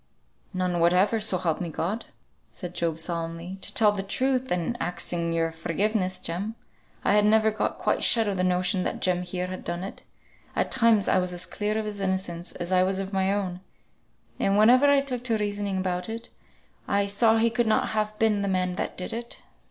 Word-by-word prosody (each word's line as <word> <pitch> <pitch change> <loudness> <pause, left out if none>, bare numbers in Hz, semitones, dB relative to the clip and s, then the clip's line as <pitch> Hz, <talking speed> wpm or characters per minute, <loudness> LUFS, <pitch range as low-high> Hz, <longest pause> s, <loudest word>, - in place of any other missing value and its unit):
"None 180 -2 -1
whatever, 180 +6 +3
so 210 -3 +3
help 170 -2 -1
me 175 - -3
God!" 185 +8 -3 0.4
said 180 -3 -8
Job, 170 -2 -1
solemnly. 170 +2 -4
"To - - -1
tell 210 -2 +4
truth 255 +7 -1
(and 180 +6 -1
axing 170 -1 -2
your 165 0 0
forgiveness, 185 +4 -1
Jem), 200 +7 -4 0.5
I - - +4
had 210 0 +5
never 220 +1 +4
got 215 - -2
quite - - 0
shut 225 -2 +5
of 200 - -1
the 180 - 0
notion 185 +1 +1
that - - -2
Jem 180 -1 +1
here 180 0 -3
had 185 0 -6
done 175 +1 -4
it. 195 - -7 0.5
At - - 0
times 230 -5 +4
I - - +3
was 180 0 -2
as 175 +1 -3
clear 210 +4 -2
of 220 - -2
his 210 -1 -4
innocence 185 -2 -2
as 175 +1 -5
I 185 -1 +4
was 190 +1 +1
of 195 +1 -4
my 190 0 +1
own; 190 -3 -2 0.8
and 195 +1 +2
whenever 250 +6 +6
I 285 -1 +5
took 255 -3 -4
to 230 -3 +2
reasoning 205 -2 -2
about 180 +1 -2
it, 230 +1 -5 0.6
I 200 0 +2
saw 220 +3 +3
he 230 +1 +3
could 240 -1 +1
not 220 - +2
have 215 0 -2
been 215 -2 +2
the 200 - -1
man 185 -1 0
that - - -3
did 185 +5 -4
it. 235 +1 -6
195 Hz, 205 wpm, -26 LUFS, 180-215 Hz, 0.8 s, whenever